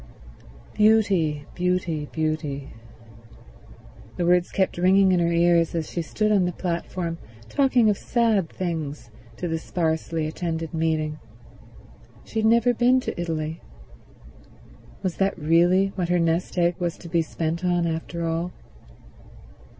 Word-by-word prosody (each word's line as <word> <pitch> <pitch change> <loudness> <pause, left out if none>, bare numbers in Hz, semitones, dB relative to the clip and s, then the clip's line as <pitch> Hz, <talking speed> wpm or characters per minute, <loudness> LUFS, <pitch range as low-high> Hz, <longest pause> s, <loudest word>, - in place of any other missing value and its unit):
Beauty, 195 -9 +3
beauty, 175 -4 -1
beauty... 155 -3 -3 1.5
the 175 - 0
words 175 0 +3
kept 190 -2 0
ringing 190 +1 +5
in 180 - +3
her 170 0 +1
ears 170 0 +3
as 160 -2 -3
she 170 - -2
stood 215 +6 -1
on 195 -4 +3
the 180 - 0
platform 170 -1 -3 0.3
talking 260 -5 +3
of 205 -2 +2
sad 225 -8 +1
things 155 -8 -4 0.3
to 180 - -3
the 165 -1 -2
sparsely 160 -1 -1
attended 165 +1 -4
meeting. 155 -1 -1 1.0
She 220 - -4
had 220 - +3
never 235 +2 +4
been 245 +2 +3
to 175 - -4
Italy. 160 -1 -3 1.4
Was 185 -3 -2
that 195 0 +1
really 175 +5 +3
what 185 -3 -3
her 180 - +3
nest 165 +2 0
egg 175 0 +2
was 175 -1 -2
to 175 - -11
be 170 0 +1
spent 165 +2 -3
on 175 -1 +1
after 165 +1 -3
all? 165 +2 -2
170 Hz, 135 wpm, -24 LUFS, 160-185 Hz, 1.5 s, ringing